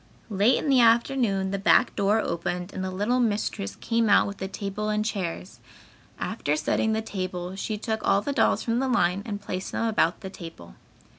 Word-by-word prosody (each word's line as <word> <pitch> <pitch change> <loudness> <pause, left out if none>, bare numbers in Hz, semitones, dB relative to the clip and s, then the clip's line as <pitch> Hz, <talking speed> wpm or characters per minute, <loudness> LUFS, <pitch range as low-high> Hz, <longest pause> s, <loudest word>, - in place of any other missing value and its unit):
Late 205 +5 +3
in - - -3
the 270 -2 +4
afternoon 230 -4 +2
the 195 - -2
back 215 +5 +4
door 200 +2 +2
opened 180 -1 -3
and 190 - -4
the 190 - -2
little 205 +7 0
mistress 205 - -1
came 230 -1 0
out 200 - +6
with 200 -1 -7
a 190 - -2
table 200 +2 -4
and 210 0 0
chairs. 170 - -4 0.6
After 145 - -1
setting 220 +8 0
the 220 0 -1
table 185 -3 -4
she 210 +2 -3
took 220 +1 -3
all 195 0 +3
the 285 - -2
dolls - - +2
from 230 0 0
the 265 - 0
line 195 -6 +2
and 205 -2 -4
placed 185 -2 -5
them 230 - -1
about 180 -6 +1
the 190 - -7
table. 165 - -10
200 Hz, 200 wpm, -26 LUFS, 185-225 Hz, 0.6 s, out